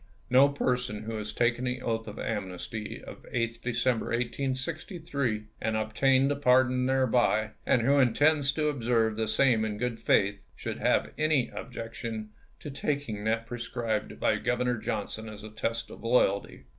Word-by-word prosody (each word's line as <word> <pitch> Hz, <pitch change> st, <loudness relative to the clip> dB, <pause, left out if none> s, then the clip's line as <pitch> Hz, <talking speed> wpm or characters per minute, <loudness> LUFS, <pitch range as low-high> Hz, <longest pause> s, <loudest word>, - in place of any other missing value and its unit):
No 135 Hz, +3 st, +7 dB
person 125 Hz, -6 st, -1 dB
who 110 Hz, +1 st, -4 dB
has 105 Hz, 0 st, -4 dB
taken 120 Hz, +1 st, +1 dB
the 125 Hz, 0 st, -1 dB
oath 115 Hz, -1 st, -2 dB
of 105 Hz, +1 st, -7 dB
amnesty 105 Hz, +1 st, -4 dB
of -, -, -10 dB
8th 115 Hz, -1 st, -1 dB
December, 120 Hz, -1 st, 0 dB
1863, 130 Hz, -, -2 dB, 0.2 s
and 110 Hz, -1 st, 0 dB
obtained 130 Hz, +5 st, +3 dB
a -, -, +1 dB
pardon 125 Hz, -2 st, +3 dB
thereby, 125 Hz, -4 st, +2 dB, 0.2 s
and 120 Hz, -, +3 dB
who 140 Hz, +3 st, +4 dB
intends 140 Hz, +3 st, +4 dB
to 150 Hz, 0 st, +1 dB
observe 115 Hz, -5 st, +1 dB
the 110 Hz, 0 st, -1 dB
same 120 Hz, -4 st, +3 dB
in 105 Hz, -1 st, -2 dB
good 120 Hz, 0 st, -2 dB
faith, 100 Hz, +1 st, +2 dB, 0.2 s
should -, -, -5 dB
have -, -, +2 dB
any 155 Hz, -5 st, +2 dB
objection 115 Hz, -3 st, -6 dB, 0.3 s
to 145 Hz, -, -6 dB
taking 135 Hz, -7 st, -2 dB
that 115 Hz, +1 st, 0 dB
i^rescribed 115 Hz, -3 st, -3 dB
by -, -, +2 dB
Governor 125 Hz, -1 st, 0 dB
Johnson 110 Hz, +1 st, -4 dB
as 105 Hz, -1 st, -10 dB
a 110 Hz, -, -8 dB
test 115 Hz, +1 st, -3 dB
of -, -, -11 dB
loyalty. 110 Hz, -4 st, +1 dB
120 Hz, 155 wpm, -29 LUFS, 110-130 Hz, 0.3 s, No